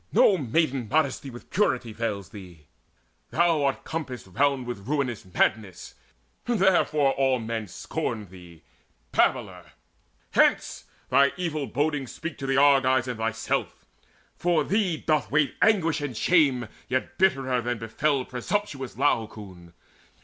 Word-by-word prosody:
No 200 - +5
maiden 135 -4 0
modesty 140 -2 0
With 120 -1 -12
purity 125 - 0
veils 105 -5 -3
thee: 90 -6 -12 0.6
thou 165 -3 +2
art 140 -1 0
compassed 140 -8 -5
round 135 +7 0
With 120 -4 -7
ruinous 135 -6 -1
madness; 95 -2 -1 0.5
therefore 185 - +3
all 135 -1 +2
men 115 -2 -4
scorn 105 +4 -4
Thee, 90 -3 -15 0.5
babbler! - - 0 0.6
Hence, - - +2 0.3
thine 140 +2 +4
evil 155 -6 -2
bodings 145 +2 -1
speak 165 -2 -7
To 135 - -4
the 135 0 +1
Argives 135 -2 +4
and 120 -3 -4
thyself! 115 0 -2 0.5
For 170 -2 +1
thee 195 -2 0
doth 155 -1 0
wait 145 -1 +2
Anguish 165 -8 +3
and 135 -6 -4
shame 140 -9 +3 0.2
yet 130 +1 -2
bitterer 135 -9 +2
than 120 0 -2
befell 125 +5 -1
Presumptuous 135 0 -3
Laocoon. 105 -10 -2
135 Hz, 130 wpm, -26 LUFS, 115-155 Hz, 0.6 s, No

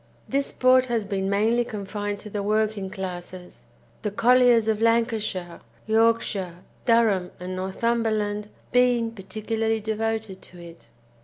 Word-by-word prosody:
This 275 0 0
sport 255 0 +4
has 230 -4 -1
been 195 -1 -2
mainly 220 +4 +2
confined 205 -2 -4
to 210 - -9
the 205 - -2
working 210 -1 0
classes, 185 -2 -8 0.4
the 210 - -1
colliers 240 +1 +4
of 220 -1 0
Lancashire, 225 -6 0 0.2
Yorkshire, 220 -5 +1 0.2
Durham, 220 -6 +3
and 180 +1 -5
Northumberland 210 +1 -1 0.2
being 245 -2 +3
particularly 220 +2 -2
devoted 220 -2 -3
to 180 - -11
it. 170 -1 -13
215 Hz, 125 wpm, -25 LUFS, 195-230 Hz, 0.4 s, sport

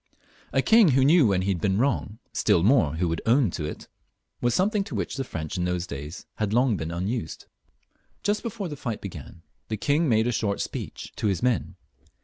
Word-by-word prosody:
A - - +2
king 225 -3 +6
who 135 -2 +4
knew 155 -2 +6
when 95 -2 +1
he 100 - -1
had 90 -4 -1
been 95 +1 +1
wrong, 110 -4 0 0.2
still 85 - +2
more, 100 - +4
who 90 +2 0
would 85 0 -2
own 120 -4 +4
it, 75 -1 -5 0.5
was 120 -1 +2
something 200 +2 +2
to 135 - -6
which 95 -4 -2
the 135 - -2
French 85 - -5
in 90 - 0
those 90 0 -1
days 75 +2 -7
had 105 -1 -1
long 120 -1 +3
been 80 -2 -4
unused. 90 +1 -3 0.8
Just 205 +1 +1
before 205 -4 -4
the 150 - -6
fight 120 -6 -4
b^an 85 -3 -9 0.3
the 110 - -3
king 145 +7 +1
made 110 -1 +3
a 120 - +1
short 100 -3 -1
speech - - -5
to - - 0
his 95 0 -1
men. 125 -2 0
110 Hz, 205 wpm, -26 LUFS, 90-135 Hz, 0.8 s, king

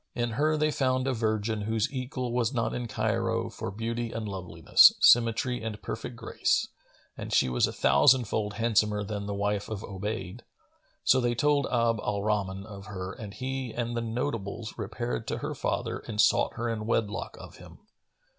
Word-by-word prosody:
In 120 -1 -1
her 155 +7 +1
they 155 0 +2
found 130 -2 +1
a 135 - +1
virgin 110 -1 -1
whose 110 +4 -1
equal 125 -1 -3
was 120 -1 +1
not 115 -1 0
in 120 -1 -3
Cairo 115 +1 -1
for 95 - -5
beauty 115 +3 -3
and 110 -1 -4
loveliness, 90 -4 +5
symmetry 120 +1 +4
and 110 -2 -5
perfect 115 +2 -5
grace, - - 0 0.5
and - - -7
she - - +3
was 60 - +2
a - - -4
thousand 75 - +5
fold 105 0 -2
handsomer 105 -2 +1
than 100 0 -4
the 100 - -3
wife 100 0 -1
of 105 -2 -5
Obayd. 95 -1 -5 0.6
So 130 - +4
they 120 -1 +1
told 145 +2 +2
Abd 115 -2 +1
al 100 -1 -2
Rahman 100 -2 -1
of 100 -3 -10
her 95 -1 -5
and 105 -3 -8
he 130 +1 -4
and 120 0 -2
the 115 - -1
notables 115 -2 -3
repaired 115 +1 -4
to - - -2
her - - -4
father - - -2
and 105 -2 -7
sought - - +3
her 120 - -2
in 110 -2 -3
wedlock 110 -3 -1
of - - -11
him. - - -13
115 Hz, 185 wpm, -28 LUFS, 105-120 Hz, 0.6 s, loveliness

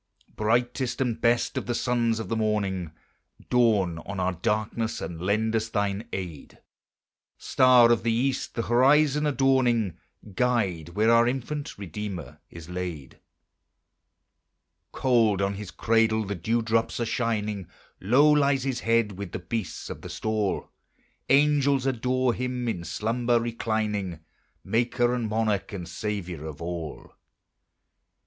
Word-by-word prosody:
Brightest 120 +3 0
and 120 -4 -1
best 120 0 +2
of - - -9
the 120 - -1
sons 120 -2 +1
of 110 - -5
the 115 - -1
morning, 100 -6 -1 0.6
Dawn 105 -9 +3
on 100 +2 -6
our 90 0 +1
darkness, 110 +5 -1
and 85 -2 -6
lend 110 +4 +1
us 110 0 0
thine 100 +1 -1
aid; 85 -7 -6 0.8
Star 125 -2 +5
of 120 - +3
the 115 +1 0
East, 130 +4 -1
the 115 - -1
horizon 145 +5 +4
adorning, 130 - +2 0.3
Guide 100 -9 0
where 110 +2 +3
our 115 0 +5
infant 140 +4 -3
Redeemer 100 -2 -6
is 85 -1 -11
laid. 90 -6 -6 1.7
Cold 115 -6 +2
on 100 0 0
his 100 -1 -7
cradle 110 +1 +2
the 100 - -3
dew 110 +6 -1
drops 115 +1 0
are 120 - 0
shining, 105 -5 -2 0.3
Low 125 +10 +4
lies 140 -3 +3
his 130 -2 -2
head 115 -2 +2
with 100 -4 -6
the - - -2
beasts 90 +2 -5
of - - -7
the - - -8
stall; 110 -3 -2 0.6
Angels 140 -1 +3
adore 130 -1 +1
him 125 0 -3
in 95 -7 -2
slumber 115 +8 0
reclining, 110 -6 -2 0.4
Maker 120 +3 +1
and 120 -3 -2
Monarch 105 -3 -1
and 90 -4 -5
Saviour 90 -7 -4
of 75 -2 -8
all. 85 -2 -6
110 Hz, 135 wpm, -26 LUFS, 100-120 Hz, 1.7 s, Star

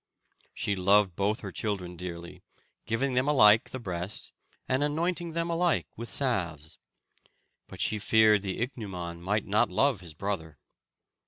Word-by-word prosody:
She 100 - -1
loved 100 0 +3
both 100 +3 0
her 100 - -6
children 90 -3 -3
dearly, 85 -1 -8 0.5
giving 130 +4 0
them 125 +2 +1
alike 110 -7 +6
the - - -5
breast, 95 -2 -5 0.4
and 130 +2 +1
anointing 170 +3 -1
them 170 +1 -1
alike 170 0 +1
with 115 0 -7
salves. 85 - -2 0.9
But - - -11
she 105 - +2
feared 110 0 +4
the 95 +2 -4
ichneumon 90 -9 -6
might 105 +4 -1
not 105 +1 +2
love 125 +5 +2
his 85 -3 -10
brother. 80 -5 -4
105 Hz, 145 wpm, -28 LUFS, 90-125 Hz, 0.9 s, alike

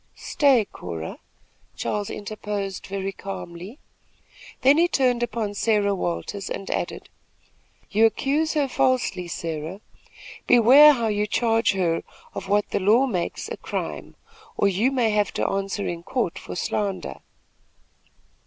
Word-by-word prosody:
"Stay, 275 -8 +3
Cora!" 85 - -7 0.6
Charles 205 -1 -2
interposed, 205 -2 -5
very 195 0 -3
calmly. 195 +2 -8 0.9
Then 275 +4 +6
he 345 - +5
turned 250 -6 +1
upon 230 -3 -2
Sarah 205 -1 +1
Williams, 190 +2 -3
and 195 - -5
added: - - -3 0.8
"You 220 +2 +5
accuse 300 +7 0
her 290 -2 +2
falsely, 255 -9 0
Sarah. 165 +2 -5 0.7
Beware 265 +6 +8
how 235 -4 -1
you 210 -1 0
charge 225 0 +2
her 170 -4 0 0.3
of 195 - -6
what 205 +1 +1
the - - 0
law 215 +7 +4
makes 185 -10 -3
a - - -6
crime, - - -5 0.4
or 200 - +3
you 205 +7 +2
may 245 -5 +1
have 210 -1 +1
to - - 0
answer 195 +1 -2
in 170 -1 -3
a - - -18
court 230 -5 -2
for - - -8
slander." 195 +1 -3
210 Hz, 135 wpm, -24 LUFS, 195-245 Hz, 0.9 s, Beware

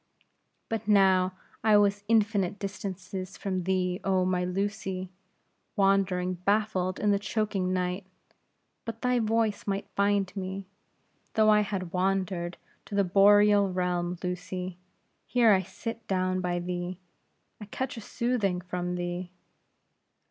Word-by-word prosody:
"But 225 -2 -3
now 190 -3 +4 0.3
I 215 -1 +6
was 205 0 +2
infinite 205 -3 +2
distances 190 -2 -6
from 185 -3 -2
thee, 185 -1 0
oh 190 -1 +2
my 180 -1 +1
Lucy, 190 0 -3 0.6
wandering 195 -2 +2
baffled 200 -2 +1
in 210 - +2
the 200 - +2
choking 200 -3 -1
night; 180 +1 -2 0.8
but 230 0 -7
thy 250 -1 +2
voice 220 -2 0
might 200 0 -2
find 200 -1 +1
me, 190 0 -4 0.7
though 215 -1 +5
I 210 0 +5
had 190 -4 -3
wandered 185 -2 -1 0.3
to 205 - -6
the 200 - +4
Boreal 205 +1 +5
realm, 180 -1 -1
Lucy. 180 0 -4 0.5
Here 240 -3 +4
I 190 - +3
sit 230 +5 -7
down 185 -1 0
by 175 -1 -1
thee; 175 0 -3 0.6
I - - -6
catch 260 +6 -4
a 225 - -7
soothing 215 -5 -1
from 180 0 -3
thee." 175 0 -3
190 Hz, 130 wpm, -28 LUFS, 180-205 Hz, 0.8 s, I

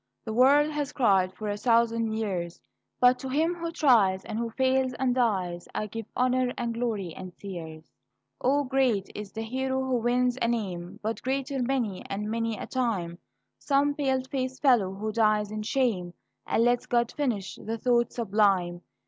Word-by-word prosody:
The 220 - -3
world 285 +5 +5
has 295 -1 -3
cried 195 -8 +3
for 215 +3 -5
a 205 - -1
thousand 230 0 +2
years; 185 -6 -3 0.4
But 250 0 +5
to 265 - -5
him 315 +6 +1
who 335 -1 -4
tries, 225 - +3
and 215 - -4
who 235 0 -2
fails 260 +1 +1
and 255 -1 0
dies, 190 -8 0
I 215 - -1
give 225 +1 -7
honor 255 0 +2
and 235 -1 -2
glory 220 -7 -2
and 185 -2 -9
tears. 160 -5 -8 0.6
O, 285 +3 +3
great 255 -7 +1
is 210 -1 -7
the 225 - -5
hero 265 +3 -2
who 260 -1 0
wins 245 +2 +1
a - - +2
name! 185 -7 -3
But 220 +1 -2
greater 270 +1 -2
many 240 -7 -1
and 210 +2 -3
many 230 -1 -1
a - - -5
time 195 -10 -2 0.4
Some 285 0 +2
pale 265 -3 0
faced 260 +1 -4
fellow 240 -9 +4
who 215 +2 -3
dies 215 -2 +2
in 215 0 -4
shame, 215 -8 0 0.3
And 230 - +2
lets 245 0 +2
God 235 -1 +1
finish 240 -10 -2
the 225 +2 -3
thought 240 +1 +2
sublime. 195 -6 +1
230 Hz, 175 wpm, -27 LUFS, 205-260 Hz, 0.6 s, world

